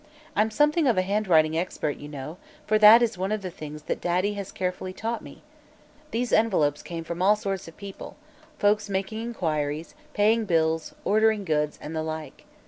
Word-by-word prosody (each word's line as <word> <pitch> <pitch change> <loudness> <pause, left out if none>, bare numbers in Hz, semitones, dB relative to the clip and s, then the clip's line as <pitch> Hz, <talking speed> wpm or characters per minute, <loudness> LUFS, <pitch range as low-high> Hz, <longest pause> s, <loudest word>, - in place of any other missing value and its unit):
I'm 215 +2 +3
something 300 +6 +2
of 235 - +3
a 185 - +3
handwriting 180 -6 +2
expert, 160 -3 -2
you 145 - -9
know, 150 +3 -7 0.3
for 215 0 +2
that 215 +3 +9
is 225 -6 -1
one 190 +2 -1
of 215 -2 -2
the 185 - -4
things 150 -3 -9
that - - -3
Daddy 180 +4 +1
has 200 -2 -6
carefully 185 0 -3
taught 225 +4 -3
me. - - -13 0.7
These 240 -1 -2
envelopes 170 -10 +2
came 165 -1 -6
from 170 +2 -5
all 200 +3 +5
sorts 195 -4 -4
of 165 - -13
people 200 -1 -9 0.4
folks 205 -1 +2
making 195 +3 -2
inquiries, 160 -9 -2 0.2
paying 220 +2 +3
bills, 160 -3 0
ordering 215 -1 +3
goods, 150 -2 0
and 155 +2 -6
the 160 - -1
like. 160 0 -6
190 Hz, 185 wpm, -26 LUFS, 160-215 Hz, 0.7 s, that